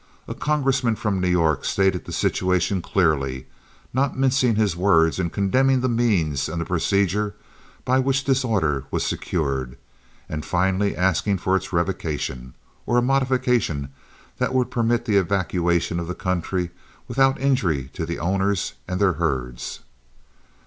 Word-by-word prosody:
A - - -4
congressman 135 -6 +1
from 100 -4 -1
New 90 - +1
York 80 -5 +2
stated 95 -2 +1
the - - -8
situation 90 +1 0
clearly, 70 -8 0 0.5
not 130 +1 0
mincing 130 -3 +2
his 105 -5 +1
words 85 -2 +3
in 90 -2 0
condemning 130 +8 +2
the 130 - +1
means 95 - +1
and 85 +1 -3
procedure 100 +3 0 0.5
by 130 +1 +3
which 135 +1 +1
this 135 -1 +2
order 80 - 0
was - - -1
secured, 70 -7 -2 0.5
and 75 -1 -4
finally 95 +3 0
asking 95 +2 +1
for 95 +1 0
its 95 0 -2
revocation, 75 -8 -2 0.3
or 120 - +2
a - - +5
modification 125 - +1 0.5
that 130 - 0
would 125 -1 +1
permit 120 0 +1
the 105 -4 +2
evacuation 85 -3 0
of 85 - -4
the 90 - -4
country 90 -1 -2 0.4
without 135 +2 +2
injury 90 - 0
to 90 - -4
the 85 +1 -3
owners 95 +3 0
and 90 0 -2
their 100 -3 +3
herds. 65 -7 -3
95 Hz, 145 wpm, -23 LUFS, 85-120 Hz, 0.5 s, a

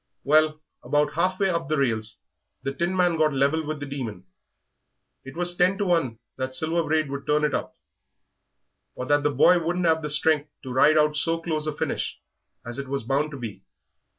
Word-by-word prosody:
Well, 155 +1 +3 0.2
about 145 0 +1
half 185 +3 0
way 195 -2 +2
up 170 -4 -2
the 155 - +1
rails 110 - -1 0.5
the 135 - -2
Tinman 175 +2 +1
got 155 -1 +3
level 140 +4 +2
with 155 0 -4
the 145 - -5
Demon. 120 -10 -6 1.0
It 135 +4 -11
was 175 0 +3
ten 180 +2 +2
to 205 - -1
one 165 -11 +1 0.2
that 130 0 -3
Silver 160 +3 +1
Braid 155 -1 0
would 140 0 -6
turn 150 0 +2
it 150 -2 +1
up, - - -3 1.2
or 125 - -5
that 145 +2 +2
the 145 - +1
boy 145 +6 +5
wouldn't 175 +2 -1
'ave 160 -1 +3
the 150 - -4
strength 150 0 +2
to 130 -2 -6
ride 150 +4 +5
out 150 0 +3
so 165 +2 0
close 155 -2 -2
a - - 0
finish - - -3 0.5
as 120 +3 -4
it 140 - -5
was 135 -1 -3
bound 140 +5 0
to 145 - -8
be. 110 -6 -7
150 Hz, 200 wpm, -25 LUFS, 135-165 Hz, 1.2 s, boy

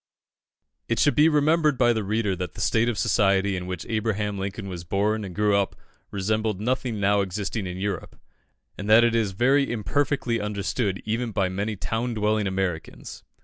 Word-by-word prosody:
It 115 - 0
should 145 - +3
be 155 +2 +5
remembered 150 -1 +3
by 120 -1 +4
the 110 -2 -2
reader 105 -1 0
that 90 -3 -5
the - - -9
state 115 +4 +2
of 115 - -2
society 100 -1 +2
in 90 -1 -5
which 90 -3 -5
Abraham 105 -2 -1
Lincoln 100 +1 -4
was 90 -3 -6
born 105 +4 0
and 95 -3 -7
grew 105 -1 +2
up 100 -1 0 0.3
resembled 110 +1 -1
nothing 120 0 -1
now 100 0 +3
existing 100 +1 -3
in 90 0 -5
Europe, 95 -2 -4 0.6
and 100 +1 -4
that 110 +2 +7
it 120 -1 +3
is 110 -4 +1
very 135 +7 +2
imperfectly 120 +2 0
understood 105 0 -2
even 115 +2 -2
by 100 -3 0
many 100 +3 -2
town 115 +4 -2
dwelling 105 -1 +1
Americans. 95 -4 -4
105 Hz, 180 wpm, -25 LUFS, 95-115 Hz, 0.6 s, that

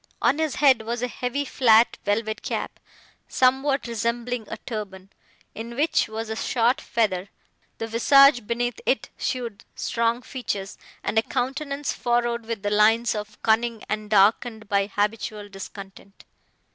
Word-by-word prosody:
On 295 - +2
his 315 -3 0
head 265 -5 +5
was 235 +2 -3
a - - +1
heavy 250 +3 -3
flat 235 -3 +4
velvet 215 +1 -1
cap, - - -4 0.5
somewhat 270 +2 +2
resembling 235 0 -2
a - - -5
turban, 195 -4 -7 0.4
in 230 +2 -7
which 300 +5 +2
was 220 +1 -5
a 220 - -4
short 240 +2 +1
feather; 200 -4 -1 0.5
the 225 - -3
visage 245 +1 +5
beneath 240 -1 -1
it 265 - +1
showed 240 -5 -4
strong 235 +1 0
features, 200 -7 -5 0.2
and 220 - +2
a - - +3
countenance 280 +4 -2
furrowed 240 -1 0
with 225 -3 -4
the 205 - -1
lines 220 +3 +4
of 210 -1 -6
cunning 225 0 +1
and 215 0 -3
darkened 215 +2 +3
by 200 0 +1
habitual 210 0 -2
discontent. 195 0 -11
230 Hz, 145 wpm, -24 LUFS, 210-245 Hz, 0.5 s, head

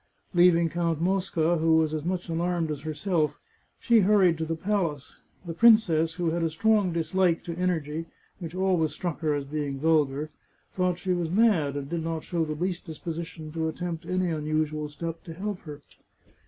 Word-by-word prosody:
Leaving 175 -1 +5
Count 165 -1 -1
Mosca, 175 -2 +1
who 160 0 +3
was 160 -1 +1
as 155 -2 -2
much 180 +1 -2
alarmed 170 -1 -1
as 145 -2 -4
herself, 155 +1 -1 0.4
she 235 -2 +4
hurried 190 -4 +4
to 160 0 -3
the 165 +1 -2
palace. 165 -6 -2 0.3
The 170 - -4
princess, 170 -7 +4
who 175 -2 0
had 170 +1 -1
a 165 - +1
strong 205 +3 +2
dislike 170 +1 +1
to 170 - -5
en 180 +1 +1
ergy, 160 -1 -3 0.3
which 170 -1 -7
always 185 -4 +1
struck 175 -4 -4
her 155 -2 0
as 145 -1 -3
being 140 -1 -3
vulgar, 150 -1 +1 0.4
thought 180 -1 0
she 185 0 -1
was 175 -2 -1
mad, 180 -8 +3
and 140 -1 -5
did 165 +1 -3
not 165 -1 -3
show 170 -2 -1
the 155 -1 -3
least 180 +2 -3
disposition 160 -1 -6
to 160 0 -2
attempt 170 +1 -4
any 185 -1 0
unusual 155 -1 -1
step 165 +3 -6
to 165 - -8
help 200 +1 -4
her. 150 -2 -10
165 Hz, 185 wpm, -27 LUFS, 155-180 Hz, 0.4 s, Leaving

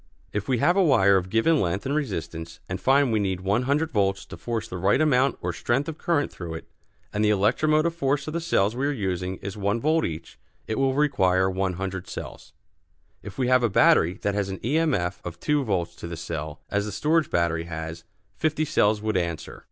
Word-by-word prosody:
If 105 -1 -3
we 130 - +2
have 175 +9 +3
a 195 - +4
wire 100 - +5
of 95 -1 0
given 130 +10 +3
length 95 +2 -1
and 135 - -1
resistance 85 - -4
and 90 - -4
find 135 -1 +3
we 110 - +2
need 95 -3 -1
100 130 +11 +1
volts 95 -4 0
to - - -9
force 115 -2 -4
the 90 -4 -6
right 100 +8 +3
amount 135 -4 +3
or 90 0 -2
strength 130 - 0
of 160 -1 -6
current 165 -4 0
through 85 -2 -7
it, 80 - -9 0.5
and 105 - 0
the 105 - +4
electromotive 155 - +2
force 140 -3 0
of 155 - -4
the 170 - -2
cells 110 - +1
we 135 +3 0
are - - +1
using 95 -6 -2
is 100 +1 -5
one 100 +3 0
volt 160 +5 +2
each, 80 0 -6 0.3
it 110 - -2
will 135 -1 +2
require 95 -11 +2
100 95 0 -3
cells. - - -8 0.7
If - - -10
we 130 -2 +1
have 130 0 +4
a 120 - +2
battery 90 -2 +4
that 100 - +1
has 100 -1 -1
an 95 - -5
E. 145 +7 +2
M. 160 -4 +2
F. 90 +1 -3
of 85 -1 -7
two 150 +5 +1
volts 90 -7 -1
to - - -7
the 85 -1 -6
cell, 80 -1 -5
as 100 0 0
the 105 - -4
storage 155 - +1
battery 85 -1 0
has, 80 0 -6 0.3
fifty 155 0 0
cells 105 -8 +2
would 110 -1 -1
answer. 85 -3 -3
105 Hz, 220 wpm, -25 LUFS, 90-140 Hz, 0.7 s, wire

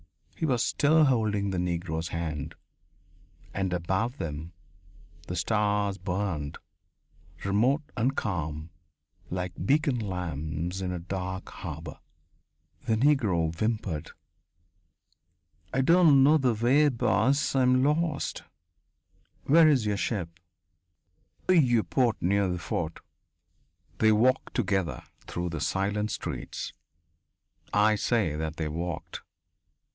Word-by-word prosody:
He 160 - -1
was 125 -5 +2
still 155 +2 +3
holding 105 -6 +1
the 90 - -1
Negro's 85 -2 -2
hand. 80 -4 -4 1.0
And 95 -1 -1
above 95 - -1
them 80 +2 -5 0.7
the 90 - -4
stars 105 +1 0
burned, 90 -5 -3 0.9
remote 120 +10 +2
and 130 +3 0
calm, 80 -5 -3 0.6
like 90 -1 -3
beacon 140 -3 +2
lamps 90 -2 -3
in 90 -1 -2
a 90 - -3
dark 95 +2 -5
harbour.... 80 -4 -7 0.9
The 110 - +2
Negro 110 - +2
whimpered: 105 -6 -2 1.6
"I 135 - +1
don't 155 -2 +6
know 155 +3 +5
the 125 -4 +2
way, 135 +7 +4
boss. 135 +2 +1
I'm 130 -1 +4
lost." 150 +1 0 1.0
"Where 160 +2 +6
is 130 -7 +3
your 105 -1 0
ship?" 85 -6 -3 1.1
"In 185 - +5
the - - +8
Vieux 120 -5 +2
Port, 120 -5 +1
near 100 +2 +2
the 90 -1 -1
fort." 80 -1 -4 1.0
They 110 - +5
walked 125 +5 +2
together 95 - -1 0.2
through 85 0 -3
the 80 -3 -5
silent 100 +4 0
streets. - - -5 1.0
I 105 +1 +4
say 105 -7 +1
that 80 0 -3
they 80 - -2
walked. 85 +2 -5
100 Hz, 115 wpm, -28 LUFS, 85-125 Hz, 1.6 s, the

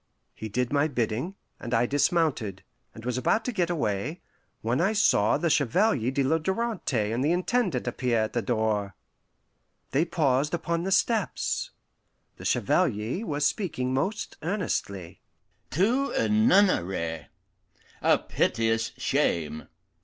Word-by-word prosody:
He 110 - -7
did 125 +5 -1
my 145 +1 +3
bidding, 125 - -2 0.2
and 120 -1 -2
I 115 +2 +3
dismounted, 140 - 0 0.3
and 110 - -10
was 125 0 -1
about 170 - +1
to 250 - -1
get 180 -6 0
away, 140 - -2 0.4
when 120 +7 +1
I 195 +5 +2
saw 110 - +3
the 170 - 0
Chevalier 145 - +2
de 135 +1 0
la 160 +5 +2
Darante 175 - -1
and 120 +3 0
the 150 - +2
Intendant 180 - 0
appear 125 -1 0
at 110 - -4
the 120 - 0
door. 105 -3 -1 1.0
They 145 +6 +2
paused 150 -2 +1
upon 170 0 -2
the 195 - -2
steps. 215 +2 0 0.7
The - - -10
Chevalier 115 - 0
was 145 0 0
speaking 130 -10 -1
most 190 +11 -2
earnestly: 145 - -3 0.5
"To 240 - +1
a - - +1
nunnery 140 - +2 0.7
a - - +4
piteous 115 0 0
shame! 80 -2 0
135 Hz, 135 wpm, -27 LUFS, 115-180 Hz, 1.0 s, a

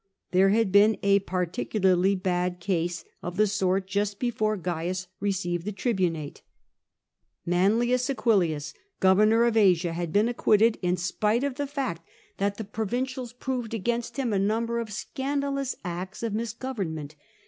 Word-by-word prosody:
There 190 +1 +5
had 215 -1 +2
been 205 +2 +5
a 200 0 +5
particularly 185 +1 +1
bad 180 -1 -1
case 175 -2 -2 0.2
of 175 0 -6
the 215 - +5
sort 190 -1 0
just 200 +1 -1
before 215 -3 0
Cains 180 +1 -3
received 180 -4 -1
the 210 - -3
tribunate. 180 - -2 1.1
M'AquDius, 205 - +2 0.3
governor 215 +5 +5
of 235 -1 +2
Asia, 180 -5 +4
had 170 -1 -3
been 205 +5 +3
acquitted, 225 -2 +3
in 180 0 +1
spite 210 +7 0
of 280 -1 -1
the 285 -1 -2
fact 270 - -3 0.4
that 200 0 -1
the 220 - -4
provincials 245 +5 -3
THE 245 - -18
EQUESTRIAN 260 +1 -2
JURIES 245 - -3
65 - - -12
proved - - -10 0.4
against - - -11
him 250 -5 0
a 195 -1 +2
number 230 +1 -1
of 225 -2 -5
scandalous 275 +3 -2
acts 180 +5 -5
of 225 -3 -1
mis 220 0 -2
government. 185 - -5
200 Hz, 160 wpm, -27 LUFS, 180-230 Hz, 1.1 s, There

